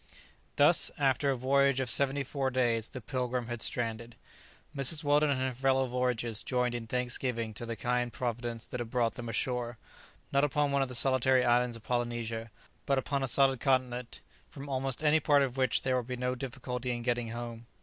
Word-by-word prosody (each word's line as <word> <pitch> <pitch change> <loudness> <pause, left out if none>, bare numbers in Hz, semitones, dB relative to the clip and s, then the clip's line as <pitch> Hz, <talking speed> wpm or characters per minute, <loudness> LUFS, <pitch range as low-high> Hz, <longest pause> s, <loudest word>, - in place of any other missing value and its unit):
Thus, - - +5
after 140 0 +1
a 135 - +1
voyage 140 +1 +2
of 130 - -1
seventy 140 +4 +3
four 135 0 -2
days, 120 -3 +1
the 130 - -9
"Pilgrim" 125 0 -3
had 120 -1 -6
stranded. 115 -1 -4 0.6
Mrs. 140 +3 +4
Weldon 145 +1 +3
and 140 -2 0
her 130 0 -1
fellow 135 +1 +1
voyagers 125 -3 -1
joined 125 -1 -1
in 120 -1 -5
thanksgiving 120 -2 0
to 120 +3 -7
the 115 - -4
kind 120 +1 -1
Providence 120 0 -4
that 125 - -6
had 120 -2 -5
brought 120 -2 0
them 120 -1 -7
ashore, 120 0 -2 0.5
not 140 0 +2
upon 145 0 +1
one 140 0 +1
of 135 - -1
the 125 - -3
solitary 130 0 +4
islands 120 0 +2
of 115 - -11
Polynesia, 120 -2 -3 0.4
but 140 - +2
upon 140 +1 -1
a 135 - -1
solid 135 0 +4
continent, 125 -2 -1 0.3
from 140 0 -10
almost 135 +1 -1
any 155 +1 +4
part 145 -1 +3
of 130 -2 -3
which 130 -3 +1
there 130 -1 +1
would 125 -2 -2
be 125 -1 -4
no 125 +1 -1
difficulty 125 -1 -5
in 120 -1 -3
getting 120 -1 -1
home. 120 0 -7
125 Hz, 195 wpm, -30 LUFS, 120-135 Hz, 0.6 s, Thus